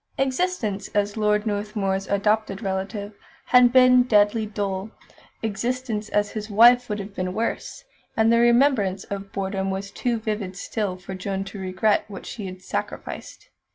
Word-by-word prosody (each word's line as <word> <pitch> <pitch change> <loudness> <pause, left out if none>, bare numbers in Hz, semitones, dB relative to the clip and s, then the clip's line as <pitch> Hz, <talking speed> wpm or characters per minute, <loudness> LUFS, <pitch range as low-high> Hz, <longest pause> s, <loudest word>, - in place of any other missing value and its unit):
Existence 265 - -1
as 205 0 +1
Lord 210 -1 +1
Northmuir's 205 -2 -2
adopted 210 +1 0
relative 200 +2 -3 0.3
had 250 -1 +6
been 255 0 +7
deadly 215 -2 +3
dull; 200 -1 -3 0.5
existence 225 +1 -2
as 205 0 +1
his 215 0 -5
wife 240 +4 +6
would 210 - -1
have 200 0 -7
been 185 -1 -3
worse; 230 - -3 0.3
and 225 +1 +4
the 235 - +4
remembrance 235 -6 +3
of 200 0 -6
boredom 195 0 -2
was 195 +1 -4
too 240 +2 -1
vivid 210 -4 -4
still 200 -1 -3
for 190 +1 -8
Joan 190 +1 -3
to 195 +1 -9
regret 190 +3 +1
what 200 -3 -9
she 210 -4 -6
had 185 0 -9
sacrificed. - - -6
210 Hz, 155 wpm, -24 LUFS, 195-230 Hz, 0.5 s, been